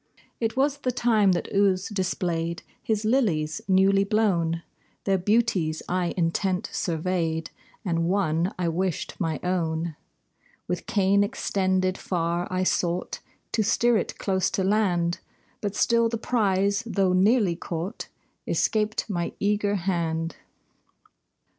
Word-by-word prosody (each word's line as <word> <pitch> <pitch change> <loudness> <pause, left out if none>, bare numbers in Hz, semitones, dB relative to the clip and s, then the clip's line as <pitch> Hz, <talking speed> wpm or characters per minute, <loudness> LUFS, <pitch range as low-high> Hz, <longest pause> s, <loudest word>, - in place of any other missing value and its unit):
It 225 +1 -1
was 280 +1 +2
the 260 -3 -1
time 220 -6 +3
that 175 - -2
Ouse 195 -2 +2
displayed 175 -4 -2 0.2
His 215 -1 -1
lilies 170 - +1
newly 195 +1 +4
blown; 180 -6 +1 0.4
Their 195 -1 +2
beauties 190 -6 +1
I 180 -1 -1
intent 180 +2 0
surveyed, 165 -1 -1 0.3
And 165 -2 0
one 180 -2 +1
I 180 -2 -1
wished 180 +1 -1
my 165 -5 -1
own. 165 -3 -1 0.7
With 180 -1 -3
cane 200 -3 +3
extended 190 -4 0
far 170 0 -1
I 185 0 0
sought 175 -1 0 0.3
To 220 - +1
steer 235 +3 +3
it - - -1
close 190 -1 0
to 190 - -1
land; 185 -4 +1 0.4
But 205 -1 -3
still 230 +1 +3
the 230 - -2
prize, 200 -3 +1
though 195 -4 +2
nearly 195 -1 +3
caught, 175 +5 -5 0.4
Escaped 215 0 0
my 175 -5 -2
eager 205 0 +1
hand. 170 -3 -1
190 Hz, 125 wpm, -26 LUFS, 170-210 Hz, 0.7 s, newly